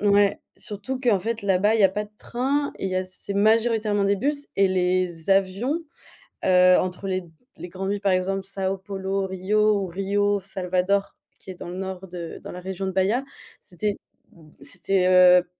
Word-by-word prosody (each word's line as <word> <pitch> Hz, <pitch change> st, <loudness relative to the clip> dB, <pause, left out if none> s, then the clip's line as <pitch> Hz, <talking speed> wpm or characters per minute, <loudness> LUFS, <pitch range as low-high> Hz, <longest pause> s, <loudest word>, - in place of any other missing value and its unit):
Ouais, 205 Hz, -1 st, +3 dB, 0.2 s
surtout 240 Hz, +4 st, -5 dB
qu'en 235 Hz, -7 st, +2 dB
fait 225 Hz, +3 st, -3 dB
là-bas, 200 Hz, +2 st, +3 dB
il 220 Hz, -, +2 dB
y -, -, +6 dB
a -, -, +7 dB
pas 210 Hz, +2 st, -3 dB
de 210 Hz, -, -18 dB
train 275 Hz, +6 st, -1 dB
et -, -, -5 dB
il -, -, -3 dB
y 185 Hz, -, -1 dB
a 185 Hz, -, 0 dB
c'est 185 Hz, +2 st, -6 dB
majoritairement 215 Hz, -1 st, +2 dB
des 200 Hz, 0 st, +2 dB
bus 285 Hz, +6 st, -1 dB
et 195 Hz, -, +5 dB
les 180 Hz, -2 st, 0 dB
avions, 195 Hz, -, +1 dB, 0.6 s
heu, 180 Hz, -1 st, +6 dB
entre 185 Hz, +2 st, -3 dB
les 185 Hz, 0 st, -1 dB
d 170 Hz, -, -16 dB, 0.3 s
les 180 Hz, -, -7 dB
grandes 190 Hz, +2 st, -4 dB
villes 205 Hz, 0 st, -2 dB
par 195 Hz, -1 st, +2 dB
exemple 190 Hz, +1 st, 0 dB
São 195 Hz, 0 st, -2 dB
Paulo 195 Hz, 0 st, -2 dB
Rio 210 Hz, +3 st, +2 dB
ou 190 Hz, -, -3 dB
Rio 200 Hz, +3 st, 0 dB
Salvador, 190 Hz, +1 st, -1 dB, 0.2 s
qui -, -, -14 dB
est -, -, -9 dB
dans 175 Hz, -, -8 dB
le 175 Hz, -, -6 dB
nord 190 Hz, 0 st, -5 dB
de 175 Hz, -2 st, -7 dB
dans -, -, -7 dB
la 180 Hz, -, -7 dB
région 190 Hz, +1 st, -4 dB
de -, -, -1 dB
Baya. 195 Hz, +8 st, +1 dB, 0.4 s
C'était 205 Hz, +3 st, -3 dB, 0.6 s
c'était, 185 Hz, +4 st, 0 dB
heu, 180 Hz, -1 st, +7 dB
heu, 175 Hz, -, -6 dB
195 Hz, 200 wpm, -24 LUFS, 185-205 Hz, 0.6 s, a